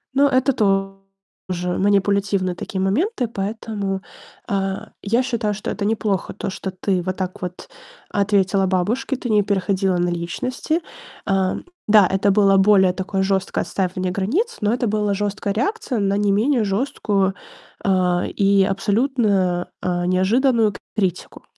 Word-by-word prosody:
Ну, 285 +1 +5
это 260 0 +2
тоже 195 -3 -3
манипулятивные 200 -2 +1
такие 190 +2 -5
моменты, 250 - 0
поэтому, 205 -2 -3 0.5
а, 195 -1 -2
я 230 +5 +1
считаю, 230 -4 -1
что 210 - -5
это 205 - -3
неплохо, 215 -2 -1
то 200 - -4
что 190 - -5
ты 185 0 -1
вот 185 +1 -3
так 190 +2 -4
вот 180 -1 -6 0.4
ответила 195 -1 +2
бабушке, 205 +9 0
ты 250 -1 -5
не 210 -1 +5
переходила 190 -1 0
на 175 0 +1
личности. 245 - -2 0.4
А, 190 -1 +1 0.3
да, 210 -3 +6
это 195 +1 +1
было 195 -1 +4
более 190 -2 +5
такое 190 +1 -2
жесткое 190 -1 0
отстаивание 185 -1 -2
границ, 275 - -1
но 210 0 +2
это 240 0 0
было 210 -1 0
жесткая 200 0 -2
реакция 275 - -1
на 200 -1 +1
не 205 0 +2
менее 230 +4 +2
жесткую, 200 -2 0 0.5
а, 180 -2 +2
и 200 -1 +3
абсолютно, 200 -3 +1
а, 175 -1 -1
неожиданную 215 +5 +2 0.2
критику. 190 -5 -2
195 Hz, 140 wpm, -21 LUFS, 190-215 Hz, 0.5 s, да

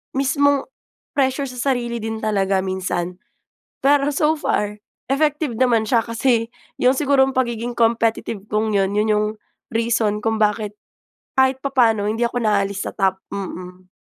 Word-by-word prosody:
mismong 280 +1 +2 0.6
pressure 270 0 +1
sa 250 +2 -1
sarili 240 -1 -3
din 220 0 -3
talaga 195 -2 +1
minsan. 180 -1 -3 0.7
Pero 285 +1 +3
so 305 +2 +2
far 210 -7 -1 0.3
effective 295 -3 0
naman 240 -4 +3
siya 230 -1 +3
kasi 230 0 +1 0.3
'yong 255 +2 +4
sigurong 270 -1 +2
pagiging 240 -2 -1
competitive 225 -3 0
kung 215 +1 0
'yon 195 -1 +1
'yon 210 +1 +1
'yong 210 0 +2 0.5
reason 225 -2 +1
kung 225 0 0
bakit 210 -1 0 0.6
kahit 265 0 +3
papaano 230 -7 +2
hindi 230 +2 -1
ako 245 +1 -3
naaalis 200 -2 +1
sa - - -4
Top. 190 -1 +1
Mm. 185 -2 -7
230 Hz, 140 wpm, -21 LUFS, 210-265 Hz, 0.7 s, yong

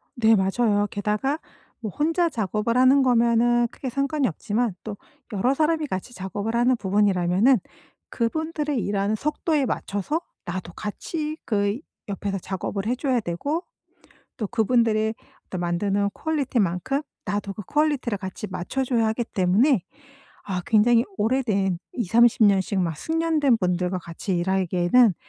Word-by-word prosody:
네. 225 -2 +5
맞아요. 205 +1 +2
게다가 210 +9 -1 0.4
뭐 225 -3 -4
혼자 330 - +1
작업을 220 - -1
하는 260 +2 +6
거면은 240 -1 +3
크게 265 - -5
상관이 275 +2 0
없지만 215 +5 -1
또 210 -2 -6 0.4
여러 225 +7 +2
사람이 310 +1 +1
같이 190 +2 -5
작업을 200 +3 -4
하는 245 +2 +3
부분이라면은 200 +3 +3 0.5
그분들의 300 +4 -1
일하는 200 0 0
속도에 300 +3 0
맞춰서 205 - -2 0.3
나도 175 0 -5
같이 305 - -4
그 205 +1 0 0.3
옆에서 200 0 -2
작업을 195 +2 -4
해 245 - +1
줘야 255 -1 +1
되고 280 - -2 0.7
또 215 - -2
그분들이 220 -1 +2 0.3
어떤 185 - -5
만드는 195 +4 0
퀄리티만큼 270 - -1 0.2
나도 205 +1 -2
그 210 - -7
퀄리티를 290 -5 0
같이 190 +2 -6
맞춰 185 +9 -2
줘야 235 -3 +1
하기 220 +2 -1
때문에 205 - +2 0.6
아 185 -2 -2
굉장히 230 +2 +4
오래된 210 -6 +1 0.2
20-30 235 +1 +4
년씩 195 -1 +3
막 165 -3 -1
숙련된 315 - +1
분들과 180 0 0
같이 175 +2 -4
일하기에는 185 +4 +3
220 Hz, 310 characters per minute, -24 LUFS, 195-260 Hz, 0.7 s, 하는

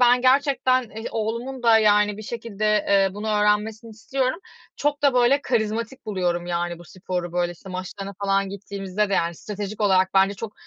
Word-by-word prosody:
ben 245 0 +5
gerçekten 260 -1 +3
i 220 -1 -9
oğlumun 235 +4 -3
da, 230 -1 +6
yani, 210 -1 +3
bir 215 - -8
şekilde, 225 -2 -5 0.2
eee, 195 -1 +4
bunu 210 +2 -4
öğrenmesini 210 +2 +1
istiyorum. 260 +6 -2 0.4
Çok 290 0 -1
da, 280 -3 +4
böyle, 250 +3 +4
karizmatik 230 +1 -2
buluyorum 175 -4 -1
yani 175 0 -2
bu 175 - -13
sporu. 180 0 -5
Böyle, 175 0 0
işte, 185 +3 -14
maçlarına 190 +2 -6
falan 195 0 +1
gittiğimizde 200 0 -3
de, - - +2
yani, 170 -1 0
stratejik 205 +3 -6
olarak 190 -2 +3
bence 195 +1 +4
çok, 210 +2 -7
210 Hz, 175 wpm, -23 LUFS, 195-235 Hz, 0.4 s, da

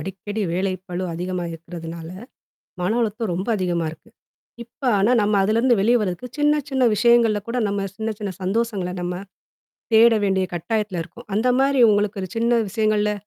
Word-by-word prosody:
அடிக்கடி 205 +3 -5
வேலைப்பளு 185 0 -3
அதிகமா 180 +1 -3
இருக்கிறதுனால, 165 0 -8 0.7
மன 180 +3 0
அழுத்தம் 220 -2 -2
ரொம்ப 190 +6 -4
அதிகமா 175 -3 -1
இருக்கு. 165 +8 -16 0.5
இப்ப, 235 - -42 0.2
ஆனா 210 +6 +3
நம்ம 205 +1 +1
அதுலருந்து 230 +5 +3
வெளிய 235 +4 +4
வர்றதுக்கு, 200 +4 -3
சின்ன, 295 0 +3
சின்ன 260 -3 +3
விஷயங்கள்ல 230 -1 +4
கூட 235 - -2
நம்ம 200 -1 -2
சின்ன, 220 0 -2
சின்ன 200 -2 -3
சந்தோஷங்கள 195 -2 -1
நம்ம, 180 +1 -4 0.7
தேட 230 +1 +7
வேண்டிய 190 -1 +1
கட்டாயத்ல 190 +1 -2
இருக்கோம். 210 +8 -15
அந்த 225 +4 +2
மாரி 275 -2 +3
உங்களுக்கு 205 -1 0
ஒரு 185 - -6
சின்ன 235 +1 +2
விஷயங்கள்ல? 210 0 +1
205 Hz, 155 wpm, -22 LUFS, 180-230 Hz, 0.7 s, தேட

